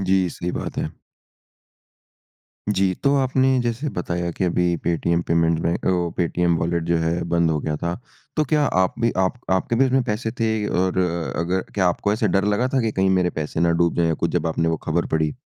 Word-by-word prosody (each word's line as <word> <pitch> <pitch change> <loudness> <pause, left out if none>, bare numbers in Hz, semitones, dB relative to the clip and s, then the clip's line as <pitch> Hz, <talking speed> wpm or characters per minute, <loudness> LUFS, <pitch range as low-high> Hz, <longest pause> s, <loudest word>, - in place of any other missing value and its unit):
जी, 95 -1 +2
सही 90 +2 -4
बात - - -5
है। - - -3 1.8
जी, 95 -2 +1
तो 140 +9 +1
आपने 130 0 +2
जैसे 120 +5 -2
बताया 85 0 -2
कि 95 - -2
अभी 90 -1 +1
पेटीएम 85 0 +1
पेमेंट 85 -1 +2
बैं 85 - +1
अ, 90 -2 0
पेटीएम 85 0 +1
वॉलेट 85 0 0
जो 85 0 +1
है 80 +1 0
बंद 85 -1 +2
हो 75 - 0
गया 75 -1 -2
था। 85 +3 -2 0.4
तो 155 - +3
क्या 150 +2 +1 0.2
आप 90 - 0
भी 115 0 +3
आप 95 +5 +1
आपके 95 +5 +1
भी 135 - +4
उसमें 130 0 +2
पैसे 110 +2 -2
थे 110 -2 +1
और 95 +1 0 0.4
अगर 90 +3 0
क्या 95 -3 +2
आपको 100 +3 0
ऐसे 110 0 +1
डर 95 +1 +2
लगा 105 +5 +1
था 130 - +3
कि 115 -2 0
कहीं 95 -1 +2
मेरे 90 - +1
पैसे 75 +1 -3
ना 85 0 +3
डूब 85 - +1
जाए 85 - +2
या 80 - +1
कुछ - - +1
जब - - 0
आपने 80 0 0
वों 80 - +1
खबर 85 +2 0
पढ़ी? 80 -1 0
90 Hz, 215 wpm, -22 LUFS, 85-105 Hz, 1.8 s, भी